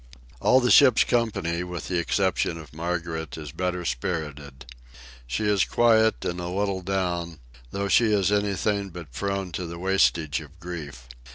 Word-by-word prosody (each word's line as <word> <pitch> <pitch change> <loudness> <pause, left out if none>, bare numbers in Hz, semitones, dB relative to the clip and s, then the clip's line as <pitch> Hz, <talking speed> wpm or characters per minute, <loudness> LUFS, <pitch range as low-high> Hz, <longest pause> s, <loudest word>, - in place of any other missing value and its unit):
All 130 - +5
the 125 -1 +2
ship's 130 -5 +7
company, 90 -8 0
with 90 -1 -6
the 90 -2 0
exception 85 -2 0
of 80 -3 -12
Margaret, 80 -2 -4
is 75 -3 -7
better 90 +2 -3
spirited. 75 -9 -4 0.6
She 65 - -2
is 105 -2 +3
quiet, 110 -2 +3
and 90 +1 -2
a 85 - -4
little 95 +1 -1
down, 90 -3 -2 0.3
though 100 +8 -2
she 110 +3 +4
is 100 -1 +2
anything 100 0 0
but 85 -5 -10
prone 100 +3 -3
to 85 +3 -4
the 85 +1 -7
wastage 85 -5 +1
of 75 +3 -15
grief. 75 -8 -8
90 Hz, 160 wpm, -25 LUFS, 80-100 Hz, 0.6 s, ship's